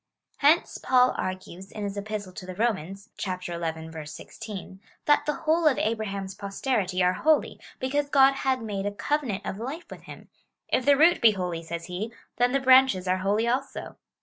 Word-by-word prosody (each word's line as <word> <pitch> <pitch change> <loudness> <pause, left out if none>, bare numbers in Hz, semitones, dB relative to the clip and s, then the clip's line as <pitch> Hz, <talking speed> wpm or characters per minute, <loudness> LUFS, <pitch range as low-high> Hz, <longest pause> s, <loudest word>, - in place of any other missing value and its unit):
Hence 305 +4 +3
Paul 255 -1 +4
argues, 185 0 -5
in 210 - -6
his 200 0 -3
Epistle 205 -2 -5
to 185 - -9
the 185 - -6
Romans, 200 -1 -2
(xi. 190 - -2 0.8
16,) 190 +4 -9 0.3
that 295 0 +3
the 300 - +2
whole 320 +1 +3
of 285 - +3
Abraham's 200 -3 -2
posterity 195 -2 -1
are 180 0 +3
holy, 310 +10 +1 0.2
because 285 +2 -1
God 275 -1 +6
had 265 -2 -1
made 200 -2 -3
a - - -1
covenant 220 -1 -2
of 195 - -4
life 280 +9 -5
with - - -9
him - - -12 0.2
— - - -56
If 255 - +1
the 285 -1 +6
root 325 0 +5
he 220 -2 +7
holy, 180 -4 -3
says 170 0 -6
he, 190 +5 -5 0.3
then 245 +1 +3
the 275 - +2
br^anches 260 -8 +5
are 185 +1 +2
holy 205 +4 +1
also. 260 +3 -3
215 Hz, 180 wpm, -26 LUFS, 190-265 Hz, 0.8 s, he